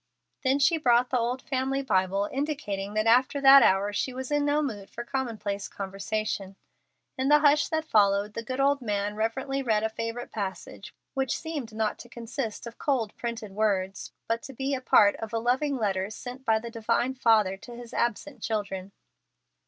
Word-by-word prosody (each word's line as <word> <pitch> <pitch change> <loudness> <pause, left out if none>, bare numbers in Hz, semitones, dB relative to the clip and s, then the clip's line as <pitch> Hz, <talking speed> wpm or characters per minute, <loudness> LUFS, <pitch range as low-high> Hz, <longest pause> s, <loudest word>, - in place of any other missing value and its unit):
Then 265 +1 +3
she 320 +4 +3
brought 245 -2 +3
the 255 - +2
old 245 +2 -2
family 270 +1 -1
Bible, 195 -3 +1
indicating 215 -9 -3
that 215 0 +1
after 250 +5 +4
that 275 0 +9
hour 200 0 +3
she 255 +4 -2
was 260 +2 -5
in 290 0 +2
no 295 +1 +2
mood 205 -8 -5
for 235 - -6
commonplace 230 -6 -3
conversation. 195 0 -4 0.6
In 265 +1 +1
the 300 - +8
hush 295 0 +4
that 315 0 -1
followed, 205 -4 +3
the 230 - -4
good 255 +4 -5
old 280 0 +3
man 205 -2 -1
reverently 265 +5 -1
read 220 -4 +1
a 220 - +1
favorite 230 +2 -5
passage, 195 -2 -6 0.2
which 270 -2 -1
seemed 300 -8 -5
not 220 -1 -1
to 240 - -11
consist 235 -1 -5
of 235 0 -10
cold, 240 -7 0
printed 230 -3 -5
words, 195 -2 -1 0.2
but 230 0 0
to 270 - -9
be 270 +2 -2
a 260 - -2
part 205 -4 +5
of 225 0 -7
a - - +1
loving 260 +5 +1
letter 195 -4 -1
sent 250 +4 -8
by 220 -1 +4
the 230 +1 -6
Divine 230 +3 0
Father 220 -6 +3
to 240 +4 -11
His 240 -1 -10
absent 240 +2 -2
children. 200 -3 -3
230 Hz, 185 wpm, -27 LUFS, 210-265 Hz, 0.6 s, that